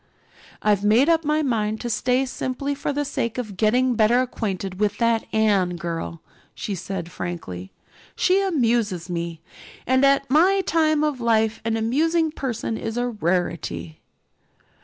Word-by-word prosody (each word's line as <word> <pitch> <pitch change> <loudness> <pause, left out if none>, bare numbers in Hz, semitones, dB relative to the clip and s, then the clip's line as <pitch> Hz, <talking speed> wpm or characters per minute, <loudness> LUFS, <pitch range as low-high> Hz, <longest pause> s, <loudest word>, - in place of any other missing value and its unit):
"I've 205 -2 +2
made 230 +9 +4
up 330 -1 +3
my 305 +1 +1
mind 220 -5 0
to 240 - -3
stay 250 +3 +1
simply 260 +2 -3
for 285 +1 -3
the 290 +1 -1
sake 235 -4 -2
of 215 -6 -4
getting 245 +6 +2
better 230 +2 +4
acquainted 195 -6 -3
with 210 -1 +1
that 230 -1 +1
Anne 200 -5 +2
girl," 170 -1 -5 0.3
she 205 - -4
said 180 -1 -5
frankly. 95 - -6 0.4
"She 380 +2 +3
amuses 230 - 0
me, 170 -2 -4 0.4
and 260 +1 +3
at 275 0 +4
my 360 +8 +4
time 310 -4 +2
of 295 -5 -1
life 225 -1 +2
an 225 0 0
amusing 315 +8 +1
person 240 -6 -3
is 225 +1 -4
a 245 0 0
rarity." 175 -5 -2
230 Hz, 150 wpm, -23 LUFS, 195-275 Hz, 0.4 s, made